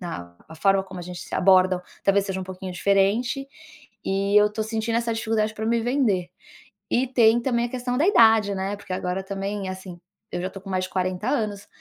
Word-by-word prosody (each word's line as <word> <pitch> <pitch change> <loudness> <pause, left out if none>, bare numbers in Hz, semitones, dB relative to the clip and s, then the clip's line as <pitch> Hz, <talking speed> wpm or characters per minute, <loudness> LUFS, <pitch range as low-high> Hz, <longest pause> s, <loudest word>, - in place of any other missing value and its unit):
na 85 - -7
a 160 - -10
forma 195 +3 +3
como 190 -1 -9
a - - -7
gente 180 -1 -7
se - - -11
abordam 185 -1 +4 0.2
talvez 200 0 +3
seja 190 -1 -3
um - - -5
pouquinho 185 0 -7
diferente, 200 +9 +1 0.6
e 195 +1 0
eu 210 0 +5
tô 220 - -2
sentindo 225 +1 -1
essa 235 -1 -1
dificuldade 220 -1 -1
pra 220 - -4
me 235 0 +2
vender. 225 -8 0 0.6
E 255 +2 +1
tem 235 -2 +4
também 235 -2 0
a - - -4
questão 250 0 -3
da 310 - +3
idade, 225 - +5
né, 195 +2 -2
porque 200 -2 -7
agora 185 +1 -2
também, 195 0 -4
assim, 185 -2 -8 0.3
eu 175 - -3
já 185 - -2
tô 195 - -10
com 195 - -10
mais 185 -1 0
de - - -11
40 185 +3 -2
anos. 210 -7 -2
200 Hz, 215 wpm, -24 LUFS, 185-225 Hz, 0.6 s, eu